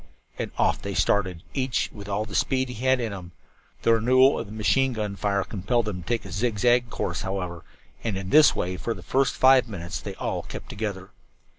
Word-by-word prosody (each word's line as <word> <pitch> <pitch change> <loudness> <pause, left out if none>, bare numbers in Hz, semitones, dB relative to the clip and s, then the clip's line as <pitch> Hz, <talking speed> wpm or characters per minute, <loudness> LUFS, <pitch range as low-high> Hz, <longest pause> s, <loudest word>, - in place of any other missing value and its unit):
And - - -2
off - - +2
they - - -4
started, 95 -4 +1
each 130 -2 -1
with 100 -2 -9
all 100 +2 -1
the 105 - -11
speed 130 +4 +1
he 125 0 -7
had 130 0 +4
in 115 -4 -2
him. 90 -3 -9 0.5
The 115 - +5
renewal 130 +4 +4
of 115 - -5
the - - -11
machine 130 +5 +2
gun 105 -3 -3
fire 100 0 0
compelled 110 +5 -1
them 95 -4 -4
to - - -14
take 120 -3 -1
a 95 - -8
zig 105 +3 -1
zag 120 +2 +3
course, - - -3
however, 90 -3 -4 0.4
and 110 -4 -1
in 95 -1 -5
this 155 0 +7
way 90 +1 -2
for 115 +4 -3
the - - -11
first 135 0 +1
five 130 -1 +5
minutes 85 -4 -5
they - - -6
all - - -2
kept - - -9
together. 100 -3 -5
110 Hz, 220 wpm, -25 LUFS, 95-125 Hz, 0.5 s, this